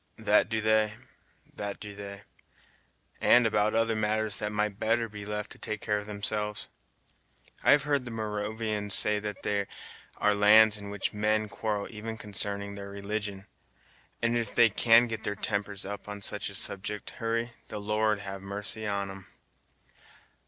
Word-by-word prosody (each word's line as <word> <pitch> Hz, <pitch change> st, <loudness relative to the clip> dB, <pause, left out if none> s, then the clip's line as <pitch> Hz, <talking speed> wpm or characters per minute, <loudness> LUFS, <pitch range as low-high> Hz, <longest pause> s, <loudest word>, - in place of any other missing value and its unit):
"That -, -, +3 dB
do 110 Hz, -1 st, 0 dB
they, 110 Hz, 0 st, +3 dB, 0.6 s
that 100 Hz, -1 st, -5 dB
do 105 Hz, -1 st, -8 dB
they; 100 Hz, 0 st, -8 dB, 1.0 s
and 120 Hz, -1 st, +6 dB
about 110 Hz, 0 st, +2 dB
other 115 Hz, 0 st, +2 dB
matters 110 Hz, 0 st, 0 dB
that 105 Hz, -, -2 dB
might 105 Hz, -1 st, -1 dB
better 115 Hz, +1 st, +2 dB
be 105 Hz, -1 st, -8 dB
left 105 Hz, 0 st, -3 dB
to -, -, -10 dB
take 110 Hz, -, -4 dB
care 105 Hz, -1 st, 0 dB
of 105 Hz, -, -9 dB
themselves. 105 Hz, 0 st, -2 dB, 0.9 s
I -, -, +3 dB
have 145 Hz, -1 st, +4 dB
heard 145 Hz, -3 st, +1 dB
the -, -, -5 dB
Moravians 105 Hz, -1 st, -1 dB
say 105 Hz, 0 st, +3 dB
that 105 Hz, -2 st, -5 dB
there 100 Hz, -1 st, 0 dB, 0.5 s
are 105 Hz, -, +3 dB
lands 105 Hz, +1 st, +7 dB
in 100 Hz, 0 st, -7 dB
which 100 Hz, +1 st, -2 dB
men 110 Hz, +1 st, +1 dB
quarrel 105 Hz, -1 st, -2 dB
even 110 Hz, 0 st, -6 dB
consarning 100 Hz, -1 st, -3 dB
their 100 Hz, 0 st, -7 dB
religion; 100 Hz, 0 st, -4 dB, 0.8 s
and 115 Hz, 0 st, +3 dB
if 115 Hz, -3 st, -1 dB
they 120 Hz, -1 st, +7 dB
can 115 Hz, +3 st, +6 dB
get 110 Hz, -2 st, -5 dB
their 100 Hz, -, -2 dB
tempers 100 Hz, -1 st, -2 dB
up 100 Hz, +1 st, -6 dB
on 100 Hz, -1 st, -6 dB
such -, -, -3 dB
a -, -, -8 dB
subject, 100 Hz, +1 st, -2 dB
Hurry, 115 Hz, +1 st, 0 dB, 0.2 s
the 105 Hz, -, -6 dB
Lord 105 Hz, 0 st, +1 dB
have 100 Hz, -1 st, -6 dB
Marcy 100 Hz, +2 st, -2 dB
on 100 Hz, -1 st, -1 dB
'em. 95 Hz, -1 st, -11 dB
105 Hz, 165 wpm, -29 LUFS, 100-110 Hz, 1.0 s, lands